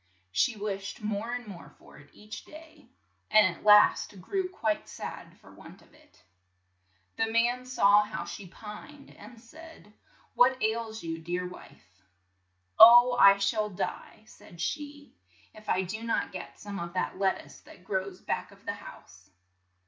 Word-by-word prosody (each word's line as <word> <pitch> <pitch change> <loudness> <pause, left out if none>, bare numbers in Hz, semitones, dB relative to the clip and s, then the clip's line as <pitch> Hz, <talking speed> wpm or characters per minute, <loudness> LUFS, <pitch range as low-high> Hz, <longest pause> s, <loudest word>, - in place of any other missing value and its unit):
She 235 - +1
wished 200 0 -5
more 210 +2 -3
and 245 0 -4
more 175 -8 -11
for - - -17
it 145 - -18
each 210 +1 -11
day, 315 +1 -15 0.4
and 210 -5 +4
at - - -18
last 210 -1 +5
grew 370 - -3
quite 220 - -2
sad - - -9
for - - -18
want - - -15
of - - -26
it. - - -24 0.9
The 225 - +1
man 240 +2 +1
saw 205 -5 +5
how 210 +1 -5
she 195 - -8
pined, 220 - -12
and 240 -3 -14
said, 310 -2 -15 0.4
"What 255 +1 +4
ails 220 0 -2
you, 165 -1 -4
dear 175 +2 -3
wife?" 95 - -15 0.8
"Oh, 240 +2 +9
I 195 0 +8
shall 210 +2 0
die," 200 +2 -6
said 175 -5 -17
she, 290 - -5 0.4
"if 215 -1 -13
I 190 - +1
do 205 +5 -6
not 230 0 -2
get 180 -1 -9
some 205 -1 -7
of 170 0 -6
that 185 0 -3
let 195 -1 +1
tuce - - -17
that 180 - -16
grows 190 -1 -4
back 180 - -3
of 200 0 -20
the 205 - -2
house." 100 - -14
210 Hz, 165 wpm, -28 LUFS, 190-235 Hz, 0.9 s, Oh